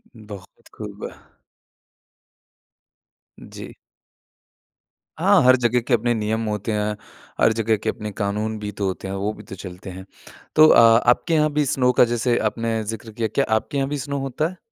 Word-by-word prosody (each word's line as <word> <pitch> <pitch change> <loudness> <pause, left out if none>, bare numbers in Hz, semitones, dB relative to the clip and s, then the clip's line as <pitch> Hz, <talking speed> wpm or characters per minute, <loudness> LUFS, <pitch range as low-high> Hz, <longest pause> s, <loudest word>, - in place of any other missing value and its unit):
बहुत 105 -4 -13
खूब। - - -7 2.3
जी। - - -10 1.5
हाँ, - - +4
हर 130 0 +7
जगह 120 0 +1
के 130 - +1
अपने 120 +1 +2
नियम 110 +1 -2
होते 105 +1 -3
हैं, 105 0 -1 0.5
हर 110 - +4
जगह 110 -1 0
के - - -3
अपने 105 -1 -5
क़ानून 105 +2 -3
भी 105 0 -5
तो 100 - -4
होते 95 +1 -5
हैं, 95 - -4
वो 100 +2 -2
भी - - -13
तो 95 - -10
चलते 90 +1 -9
हैं। 95 +1 -9 0.5
तो 155 0 +8
अ, - - +6
आपके 120 +7 +4
यहाँ 155 -1 +2
भी 150 -1 +1
स्नो 125 -1 +2
का - - +8
जैसे 120 +1 0
आपने 115 0 -1
ज़िक्र 110 +1 -7
किया, 110 +1 -2
क्या 135 +6 0
आपके 140 +5 -2
यहाँ 135 0 -1
भी 145 - -2
स्नो 140 +1 -4
होता 135 +3 -2
है? 185 - -13
110 Hz, 175 wpm, -22 LUFS, 105-125 Hz, 2.3 s, तो